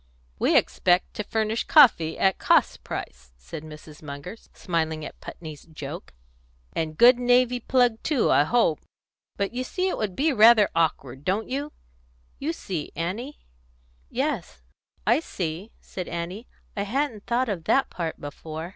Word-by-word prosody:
"We - - +4
expect 180 0 +2
to 210 - -4
furnish 220 +1 -1
coffee 225 - +5
at 190 -1 +2
cost - - +2
price," - - -7
said 60 - -8
Mrs. 155 -1 -12
Munger, 145 +6 -7 0.2
smiling 160 -3 -2
at - - -10
Putney's 155 -4 -9
joke. 155 - -8 0.6
"And 155 -1 -3
good 245 +1 +7
navy 245 0 +3
plug 245 -2 +2
too, 295 -7 +1
I 145 - +5
hope. 200 -7 +2 0.6
But 200 +2 -2
you 255 +1 -2
see 370 +8 -1
it - - -3
would 205 -4 -2
be 305 +2 +2
rather 220 -2 +6
awkward, 140 -5 -1
don't 195 +7 -1
you? 285 +3 -3 0.7
You 295 +4 -1
see, 180 - -5
Annie?" 210 - -4 0.7
"Yes, - - -3 0.4
I 235 +6 +4
see," 180 - -5
said 185 - -7
Annie. 175 +7 -5 0.3
"I 200 - -2
hadn't 230 0 -2
thought 245 +2 +1
of 185 -7 -4
that 270 - +2
part 165 -3 -4
before." 155 +3 -7
195 Hz, 150 wpm, -25 LUFS, 160-245 Hz, 0.7 s, good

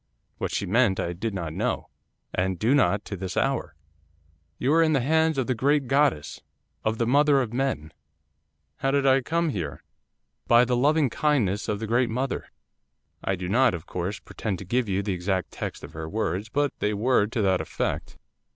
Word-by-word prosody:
What - - -1
she - - -1
meant 105 -1 +2
I 85 - -1
did 100 +4 -4
not 85 -4 -4
know, - - -2 0.5
and 95 0 0
do 110 +9 +2
not 105 -8 +2
to 100 - -5
this 95 -1 -5
hour. 135 - 0 0.8
"You 135 +4 +1
are 165 - +5
in 160 -1 +3
the 135 - +2
hands 160 +3 +2
of 130 - +1
the 130 - 0
great 140 +4 +2
goddess, 135 - +1 0.4
of 110 +1 0
the 115 - +1
mother 140 +3 +4
of 120 -4 -2
men." 125 - -2 0.8
'"How 135 - 0
did 140 0 +2
I 135 0 +5
come 165 +5 0
here?" 80 - -4 0.6
'"By 120 +1 +6
the 125 0 +1
loving 145 +1 +3
kindness 115 -10 +1
of 105 - 0
the 110 - -3
great 120 +2 +2
mother." 130 +4 -2 0.8
'I 95 - 0
do 90 0 -5
not, 120 +1 +3
of 80 - -8
course, 90 +3 -3
pretend 100 -4 -4
to 95 - -9
give 120 +3 0
you 95 +1 0
the 100 -1 -1
exact 95 0 -2
text - - -6
of - - -9
her 80 0 -6
words, 105 +1 -2
but 145 +2 0
they 105 0 0
were 110 0 +2
to 115 +1 -2
that 95 -2 +2
effect. - - -3
115 Hz, 195 wpm, -26 LUFS, 95-135 Hz, 0.8 s, By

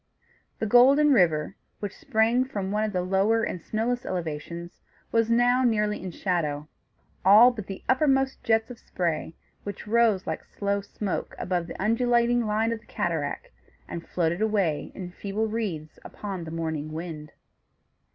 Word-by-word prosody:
The - - -2
Golden 275 +6 +6
River, 170 -5 +2 0.2
which 205 -2 -5
sprang 235 -1 +2
from 200 -7 -4
one 210 +1 +1
of 215 - -1
the 180 -2 -1
lower 195 +5 +2
and 180 - -3
snowless 235 +6 -1
elevations, 170 0 -5 0.3
was 230 0 +2
now 245 +2 +4
nearly 210 -3 +1
in 185 - -5
shadow; 155 -5 -2 0.6
all 210 +6 +8
but 215 -5 -7
the 195 - -7
uppermost 270 0 +2
jets 225 +1 +1
of 240 - -10
spray, 165 -2 -3 0.3
which 205 -1 -6
rose 220 -3 +3
like - - -4
slow 200 0 -2
smoke 200 0 -4
above 175 -2 -2
the - - -8
undulating 235 +2 +2
line 220 +2 +1
of 230 - -3
the 215 - -26
cataract, 160 -4 -2 0.4
and 170 - -7
floated 170 +2 0
away 200 -8 0
in 180 -2 -6
feeble 200 +4 -3
wreaths 200 -9 -4
upon 195 -5 -6
the - - -7
morning 160 -2 -3
wind. 155 -2 -7
205 Hz, 155 wpm, -26 LUFS, 175-230 Hz, 0.6 s, all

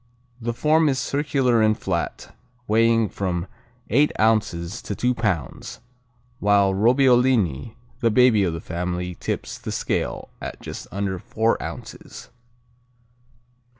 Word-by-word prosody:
The 120 0 -3
form 155 +4 +3
is 135 - 0
circular 135 -3 +1
and 110 0 +3
flat, - - -4 0.3
weighing 115 +1 +3
from 90 -2 -3 0.5
eight 145 +6 +4
ounces 105 -3 +1
to 100 - -5
two 125 +4 +1
pounds, 105 - -3 0.6
while 100 -1 +3
Robbiolini, 120 - +3 0.2
the 115 - +2
baby 115 -2 +4
of 85 -3 0
the 80 - -5
family 90 +1 -3
tips - - -5
the - - -6
scale - - -2
at - - -6
just - - -8
under 100 -2 -2
four 110 +5 0
ounces. - - -9
110 Hz, 120 wpm, -23 LUFS, 95-125 Hz, 0.6 s, eight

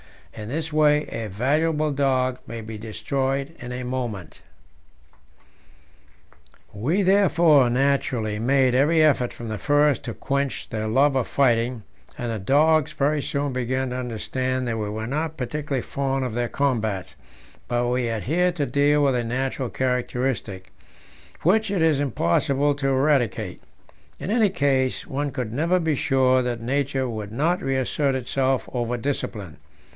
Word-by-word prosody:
In 105 0 -7
this 160 +3 -3
way 150 -1 +4
a 115 -1 -4
valuable 150 - 0
dog 130 -2 +1
may 115 0 -6
be 110 0 -7
destroyed 135 +6 -2
in 125 0 -7
a 125 0 -4
moment. 120 -9 -5 2.3
We 150 - 0
therefore 170 -8 +4
naturally 125 -4 0
made 130 +2 +3
every 155 +5 +4
effort 135 -5 +3
from 115 -1 -8
the 110 -1 -4
first 145 -2 +2
to 115 - -5
quench 140 -1 -2
their 110 -2 -3
love 135 +5 +3
of 130 -3 0
fighting, 120 -3 +1 0.3
and 120 -1 -3
the 110 - -3
dogs 150 +7 +3
very 145 +1 +1
soon 140 -1 -2
began 130 +1 -1
to 125 - -3
understand 130 +2 -2
that 115 -1 -2
we 105 -1 -2
were 110 +1 -4
not 155 +5 -3
particularly 135 0 -3
fond 135 -1 -2
of 125 - -4
their 120 +1 -1
combats; 110 -9 -1 0.5
but 120 0 0
we 125 0 0
had 115 -2 -2
here 180 +6 +2
to 150 -4 -1
deal 145 +1 +2
with 140 -2 +3
a 120 -1 0
natural 130 +1 -2
characteristic, 125 -7 -2 0.7
which 215 +5 +3
it 190 -4 +1
was 155 -4 +3
impossible 140 - +1
to 140 -1 -2
eradicate; 135 -3 +1 0.6
in 195 - -4
any 220 -2 +3
case, 135 -7 0
one 145 +2 -2
could 125 -5 -4
never 165 +7 +2
be 160 -2 0
sure 130 -2 +2
that 120 -2 -3
nature 135 +1 -1
would 110 -3 -6
not 170 - +1
reassert 135 0 0
itself 130 +1 0
over 120 -1 -1
discipline. 110 - -4
130 Hz, 150 wpm, -24 LUFS, 120-145 Hz, 2.3 s, way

